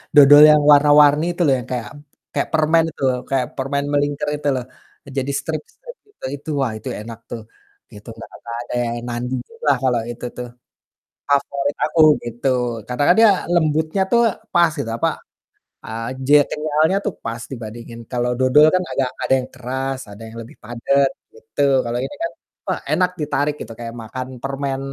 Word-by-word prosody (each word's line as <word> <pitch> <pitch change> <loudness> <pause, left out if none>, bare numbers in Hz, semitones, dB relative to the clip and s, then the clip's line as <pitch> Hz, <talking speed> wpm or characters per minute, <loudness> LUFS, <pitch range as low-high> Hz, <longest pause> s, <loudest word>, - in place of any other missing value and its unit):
dodol 145 0 +9
yang 150 0 +5
warna-warni 145 +1 +6
itu 175 - -5
loh, 140 - +4
yang 125 - -7
kayak 115 -4 -3 0.4
kayak - - -1
permen 160 +1 +3
itu - - -17
loh, 125 - 0
kayak 135 -2 +1
permen 140 +1 -1
melingker 145 0 0
itu 145 - -4
loh, 125 - -3 0.4
eee, - - -12
jadi 135 +1 -1
strip-strip 485 +1 -7 0.2
itu. - - -10
Itu, 145 +3 -11
wah 130 -4 0
itu - - -10
enak 115 +1 -8
tuh 115 - -6 0.5
gitu, 105 0 -14
nggak 110 - -10
nggak 115 0 -7
ada - - -8 0.2
yang 120 - -3
nandinginlah 130 - -2
kalau 125 -3 +2
itu 120 - -8
tuh, 125 - -5 0.8
favorit 140 0 0
aku, 155 +1 0 0.2
gitu. 120 +3 -3 0.4
Karena 125 +3 -2
kan 175 - +7
dia 225 -2 +7 0.2
lembutnya 160 +2 +1
tuh 235 - +4 0.3
pas 170 -2 +4
gitu, - - -3
apa, - - +2 0.8
eee, 115 +1 -5 0.2
je 145 - +6
kenyalnya 155 +4 +1
tuh 205 - -1
pas 115 +1 -4
dibandingin 115 -1 -8
kalau 125 -1 0
dodol 130 +4 +6
kan 185 - +1
agak 135 -2 0 0.2
ada - - +2
yang 130 - -5
keras, 130 +1 -4
ada 100 +2 -12
yang 115 +1 -11
lebih 115 - -15
padat 135 +4 +1 0.2
gitu. 150 - -6 0.2
Kalau 120 +1 -2
ini 290 - -6
kan, 335 - -2 0.4
wah - - -1
enak 180 0 +2
ditarik 145 0 0
gitu, 115 - -7
kayak 115 -1 -6
makan 130 +3 -6 0.2
permen 135 0 -3
135 Hz, 175 wpm, -20 LUFS, 120-150 Hz, 0.8 s, dodol